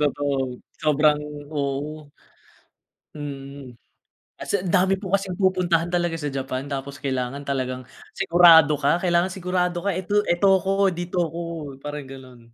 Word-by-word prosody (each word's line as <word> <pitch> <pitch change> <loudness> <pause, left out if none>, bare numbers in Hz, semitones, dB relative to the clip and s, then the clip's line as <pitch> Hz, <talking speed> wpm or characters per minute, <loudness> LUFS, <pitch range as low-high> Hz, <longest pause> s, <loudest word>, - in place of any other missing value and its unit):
totoo 145 -1 0 0.5
sobrang 150 0 +3 0.4
oo. 145 +2 -3 1.0
Mm, 140 -4 -8 0.6
at - - -9
sa 200 - +2
dami 190 +1 +2
po 195 -1 0
kasing 190 -1 -4
pupuntahan 180 -3 +2
talaga 175 -2 -1
sa 150 - -3
Japan 135 0 -4
tapos 140 0 -5
kailangan 130 -1 -2
talagang 130 -2 -3 0.2
sigurado 165 -3 +6
ka, 145 +4 +1
kailangan 175 0 +1
sigurado 180 -1 -1
ka, 195 -1 -1
eto 190 +3 +1
eto 190 +2 +4
ko 195 0 +2
dito 175 0 -2
ako 165 +1 -5 0.4
parang 145 +1 -6
ganun. 130 -2 -12
155 Hz, 135 wpm, -23 LUFS, 140-180 Hz, 1.0 s, sigurado